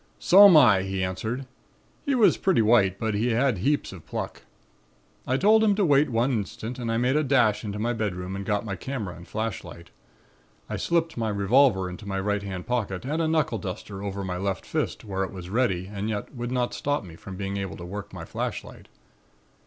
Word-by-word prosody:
"'So'm 195 -2 +8
I,' 110 -10 +6
he 95 0 -2
answered. 110 +8 -3 0.6
He 280 - +2
was 230 -4 +5
pretty 185 -12 +2
white, 105 -4 +4
but 110 0 -2
he 105 +4 0
had 120 -3 +1
heaps 140 +1 0
of 85 -5 -11
pluck. - - -5 0.9
I 130 - +2
told 215 +6 +5
him 210 -2 +4
to 200 -1 +2
wait 145 -1 +4
one 120 +3 +1
instant 110 +2 -4
and 115 -2 -2
I 115 - 0
made 125 +3 +1
a 155 - +3
dash 125 -7 +2
into 105 -1 -4
my 115 +3 -1
bedroom 95 -4 -3
and 100 - -4
got 105 +2 -1
my 100 -3 -3
camera 105 -2 -5
and 85 - -13
flashlight. 110 -6 -5 0.8
I - - -4
slipped 165 -3 0
my 115 -2 -1
revolver 100 0 +3
into 90 +3 -8
my 95 -1 -2
right 105 +1 -1
hand 95 -3 -6
pocket 110 -4 -2
and 155 +5 -1
a 160 - +1
knuckle 155 -1 +1
duster 95 0 -6
over 100 -1 -4
my 90 -1 -3
left 95 +1 -3
fist, - - -3
where 95 -2 -2
it 95 - -4
was 90 -1 -8
ready 100 -6 +1
and 100 +2 -4
yet 105 +4 -4
would 120 -1 -5
not 125 -1 0
stop 145 -3 -1
me 85 -4 -11
from 95 +3 -9
being 100 0 -3
able 95 -4 -4
to 85 - -8
work 100 +3 -7
my 90 -3 -8
flashlight. - - -5
105 Hz, 210 wpm, -26 LUFS, 95-130 Hz, 0.9 s, So'm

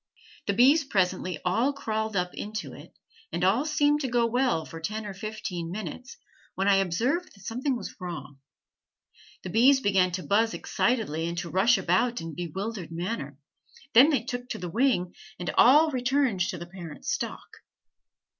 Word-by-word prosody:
The 200 - +2
bees 275 +7 +5
presently 185 - 0
all 230 +10 +2
crawled 220 -5 -3
up 180 -1 -1
into 215 +1 -5
it, - - -14 0.3
and - - -2
all 210 +10 +3
seemed 295 -1 +2
to 270 - -1
go 240 -1 +2
well 240 -8 +1
for 165 - -9
ten 215 +6 -4
or 205 - -5
fifteen 190 -4 -5
minutes, 215 - -7 0.4
when 195 +1 0
I 200 -1 +5
observed 235 - 0
that 195 -1 -16
something 255 +3 -1
was 210 - -7
wrong; 145 -6 -7 1.0
the 185 - -5
bees 260 +7 +5
began 190 -6 +2
to 185 0 -3
buzz 225 +3 +2
excitedly 200 -10 -1
and 170 0 -4
to 170 -1 -4
rush 210 +7 +4
about 195 +7 +1
in 165 - -6
a - - -8
bewildered 190 +1 -5
manner, 165 - -4 0.6
then 255 +6 +8
they 275 -7 +1
took 245 -1 -5
to - - -3
the 180 -1 -5
wing 225 -6 +1 0.2
and 175 - -3
all 300 +6 +6
returned 255 -4 +1
to - - -4
the 170 - -7
parent 175 -4 -10
stock. - - -4
215 Hz, 175 wpm, -27 LUFS, 180-250 Hz, 1.0 s, then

